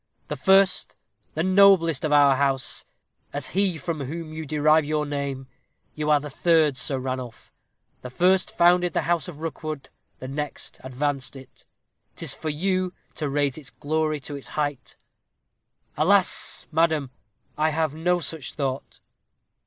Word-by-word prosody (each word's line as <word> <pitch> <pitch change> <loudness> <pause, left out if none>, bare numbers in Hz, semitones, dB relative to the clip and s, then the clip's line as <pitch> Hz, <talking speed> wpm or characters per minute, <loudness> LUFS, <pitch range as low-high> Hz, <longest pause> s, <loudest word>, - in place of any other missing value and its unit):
The - - -2
first, 195 0 +3 0.4
the 160 - 0
noblest 185 -5 +5
of 155 - 0
our 145 -2 +6
house, 135 -1 -1 0.5
was 145 -2 -3
he 190 -2 +1
from 160 +1 -4
whom 155 +3 -6
you 155 -1 -6
derive 155 +1 +4
your 150 0 -1
name. 140 -2 -3 0.5
You 150 0 -2
are 150 -1 +5
the 150 - -7
third 160 -2 +3
Sir 135 +2 -1
Ranulph; 130 -3 -6 0.5
the 125 - -7
first 180 +7 +3
founded 175 0 +4
the - - 0
house 170 0 0
of 155 -4 -9
Rookwood; 155 -3 -5 0.3
the 130 - -8
next 145 +2 -5
advanced 135 +1 -2
it; 135 -1 -14 0.5
'tis - - -4
for 155 - -4
you 185 +4 0 0.2
to 150 -2 -3
raise 145 0 0
its 140 - -9
glory 155 0 -1
to 145 - -6
its 140 - -9
height." 145 -3 -2 1.0
"Alas! 185 +5 +2
madam, 160 -4 +1 0.4
I 155 +1 +2
have 160 -1 0
no 175 +3 +1
such 160 -3 -5
thought." 135 -2 -4
150 Hz, 150 wpm, -25 LUFS, 140-165 Hz, 1.0 s, our